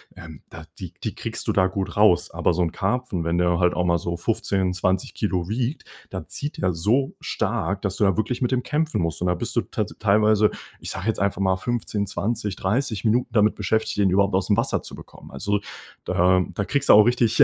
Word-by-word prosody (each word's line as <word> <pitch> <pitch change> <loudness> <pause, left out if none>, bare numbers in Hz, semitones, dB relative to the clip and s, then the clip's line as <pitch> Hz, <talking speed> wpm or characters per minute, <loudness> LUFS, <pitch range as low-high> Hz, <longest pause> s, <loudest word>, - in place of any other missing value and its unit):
ähm, 80 -3 -11
da - - -10 0.2
die - - -7
die - - -3
kriegst - - -5
du - - +4
da 95 - +3
gut 95 +1 -4
raus. 100 -5 +4
Aber - - +1
so 90 - 0
'n 85 -2 +1
Karpfen, 100 -4 -2
wenn 85 +1 0
der 90 0 +2
halt 90 -1 +3
auch 90 - 0
mal 85 -1 +2
so 85 0 -3
15, 95 0 -1
20 95 +7 -1
Kilo 95 -4 -2
wiegt, 125 +6 -2 0.3
dann - - -7
zieht 145 +2 -5
der 95 - +2
so 110 +11 +1
stark, 95 0 -2
dass 95 -1 -2
du 105 - +3
da 95 -2 +3
wirklich 115 +4 -2
mit 125 - +1
dem 125 -1 +1
kämpfen 150 - -1
musst. 85 -1 -2
Und 90 - 0
da 90 - +3
bist - - -4
du - - +5
tats - - -4
teilweise, 105 0 +4 0.3
ich - - -6
sage - - -5
jetzt 110 - 0
einfach 100 0 0
mal 95 -1 +2
15, 105 -1 -2
20, 105 +1 -2
30 110 +1 -1
Minuten 120 +2 +1
damit 105 -2 +3
beschäftigt, 110 +2 -1
den 100 -2 +3
überhaupt 100 +1 +2
aus 95 0 0
dem 105 - +3
Wasser - - 0
zu - - -9
bekommen. - - -13
Also, 105 0 -1 0.5
da 90 +1 +3
da 100 - -1
kriegst 140 +4 -1
du - - +8
auch 105 - +9
richtig 120 -2 +4
100 Hz, 230 wpm, -23 LUFS, 90-110 Hz, 0.5 s, auch